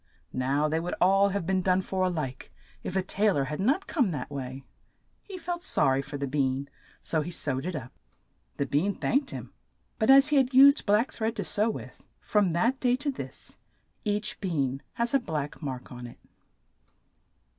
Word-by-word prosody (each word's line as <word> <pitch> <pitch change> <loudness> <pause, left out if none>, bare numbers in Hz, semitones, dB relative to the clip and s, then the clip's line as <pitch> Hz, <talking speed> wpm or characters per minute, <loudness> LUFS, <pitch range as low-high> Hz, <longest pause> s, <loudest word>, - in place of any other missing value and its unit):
Now 135 +4 +1
they 160 +1 0
would 175 +2 -3
all 195 +2 +4
have 200 -3 -2
been 190 +1 +1
done 185 0 +2
for 185 0 -1
a - - +2
like, 145 -7 -5 0.3
if 185 - -5
a 190 - +1
tai 205 +3 +1
lor 145 -8 +1
had 150 +3 -4
not 275 - +1
come 265 - +1
that 150 -3 -5
way. 135 -1 -6 0.6
He 390 -2 -9
felt 350 0 -4
sor 135 - +2
ry 135 - +1
for 140 +1 -7
the 140 - -2
bean, 135 0 -1 0.3
so 160 - 0
he 155 - -5
sewed 145 -3 -2
it 185 - -3
up. 130 -4 -6 0.7
The 140 - 0
bean 155 +9 0
thanked 275 +1 0
him, - - -7 0.5
but 220 - +1
as 275 +2 +8
he 300 - +3
had 260 -1 +2
used 280 0 +7
black 210 +5 +3
thread 225 +1 -2
to - - -2
sew 215 +2 +1
with, - - -7 0.2
from 200 -5 +1
that 235 +10 +1
day 250 -1 +3
to 285 +2 -2
this 265 - -9 0.5
each 210 0 -1
bean 140 -8 -1
has 235 +2 -1
a 275 - +5
black 155 - -4
mark 130 -4 -6
on 125 -1 -8
it. 120 - -13
185 Hz, 200 wpm, -28 LUFS, 140-235 Hz, 0.7 s, as